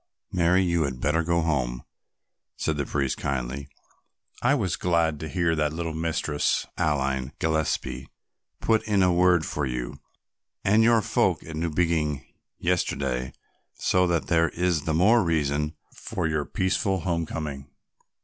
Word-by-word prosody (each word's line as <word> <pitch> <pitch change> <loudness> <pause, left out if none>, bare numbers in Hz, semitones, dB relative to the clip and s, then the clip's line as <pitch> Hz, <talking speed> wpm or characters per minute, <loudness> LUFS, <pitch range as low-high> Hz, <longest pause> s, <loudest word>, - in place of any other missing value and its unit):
"Mary, 90 +1 +3
you 85 -2 +1
had 70 -4 -2
better 75 +5 +1
go 85 +1 +1
home," 65 -7 -1 0.7
said 80 - -1
the 70 -2 -2
priest 70 -3 -1
kindly. 70 +1 -3 0.7
"I 135 +4 +4
was 100 -10 0
glad 85 -4 +1
to 80 - -5
hear 85 -3 +1
that 75 -1 0
little 80 0 -3
Mistress 80 -2 0
Aline 70 -2 0
Gillespie 75 -5 -1 0.5
put 110 -1 +2
in 100 -3 +3
a 90 -1 +4
word 90 -2 +4
for 75 - -3
you 60 -1 -4 0.6
and 105 +3 +4
your 115 -1 +4
folk - - +1
at 80 - -8
Newbiggin 80 -2 0 0.3
yesterday, 65 -8 -1 0.4
so 90 0 +2
that 85 -3 0
there 85 -1 +3
is 85 -3 0
the 80 - 0
more 110 +7 +5
reason 75 -2 0 0.2
for - - -4
your 75 -2 0
peaceful 95 0 0
homecoming." 80 -5 -3
80 Hz, 140 wpm, -26 LUFS, 70-90 Hz, 0.7 s, more